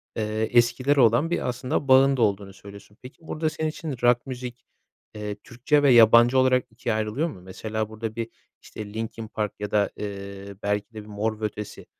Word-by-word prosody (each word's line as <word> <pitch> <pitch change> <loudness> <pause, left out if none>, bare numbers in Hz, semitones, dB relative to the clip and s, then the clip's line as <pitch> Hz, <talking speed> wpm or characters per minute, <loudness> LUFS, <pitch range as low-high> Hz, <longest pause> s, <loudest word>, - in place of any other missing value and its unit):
eee, 110 - -1 0.3
eskilere 130 +4 +3
olan 120 +7 +4
bir 175 - -1
aslında 130 +3 -2
bağın 135 +1 +5
da - - -1
olduğunu 100 -2 0
söylüyorsun. 100 +1 -14
Peki, 125 +3 -12
burada 155 0 -1
senin 155 0 -2
için 155 -2 -5
rock 120 0 +3
müzik, 125 -2 -7 0.5
eee, 105 -1 -5
Türkçe 130 +6 0
ve 140 - +6
yabancı 120 +2 +7
olarak 130 -1 +3
2'ye 115 0 -2
ayrılıyor 110 +10 -1
mu? 95 - -11
Mesela 110 +4 -4
burada 110 0 -6
bir, 115 -1 -4 0.3
işte, 105 -1 -9
Linkin 110 0 -5
Park 105 -1 -3
ya 105 0 -4
da, 105 -1 +2
eee, 100 -1 -7
belki 105 +2 -2
de 110 - -7
bir 105 - -14
Mor 105 +1 -3
ve - - 0
Ötesi. 105 0 -6
115 Hz, 190 wpm, -25 LUFS, 105-130 Hz, 0.5 s, yabancı